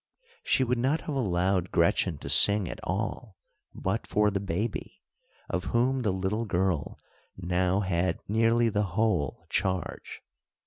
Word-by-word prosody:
She 130 - +2
would 125 -1 0
not 140 +6 +1
have 150 - -5
allowed 95 -6 0
Gretchen 85 -1 +1
to - - -7
sing 95 +7 +6
at - - -6
all, 105 +2 -4 0.4
but 95 +4 -2
for 105 0 +2
the 100 - -1
baby, 100 +4 -4 0.4
of 90 -2 -3
whom 130 +3 +1
the 110 - 0
little 95 +5 -2
girl 90 -6 -1 0.4
now 90 +1 0
had 90 -2 -1
nearly 115 +2 +2
the 105 -1 0 0.2
whole 110 -11 0
charge. 95 -1 -3
100 Hz, 140 wpm, -28 LUFS, 90-115 Hz, 0.4 s, sing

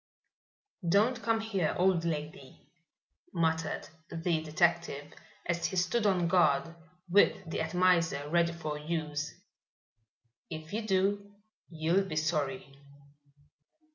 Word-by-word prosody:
"Don't 225 +6 +3
come 225 -1 +1
here, 195 -7 -1
old 180 -2 +3
lady," 150 -4 -5 0.8
muttered 160 -2 0 0.2
the - - -7 0.3
detective, 160 -2 0 0.3
as 170 -1 0
he - - -5
stood 185 +5 +1
on 180 -3 +2
guard, 165 -3 +3 0.3
with 190 0 +3
the 160 - -3
atomizer 165 -3 +2
ready 170 +2 +2
for 155 -3 -5
use. 150 -2 -3 1.2
"If 155 +1 -7
you 220 0 -2
do 200 +1 0 0.3
you'll 170 +4 +1
be 155 - -5
sorry." 145 -4 -1
170 Hz, 110 wpm, -31 LUFS, 155-190 Hz, 1.2 s, Don't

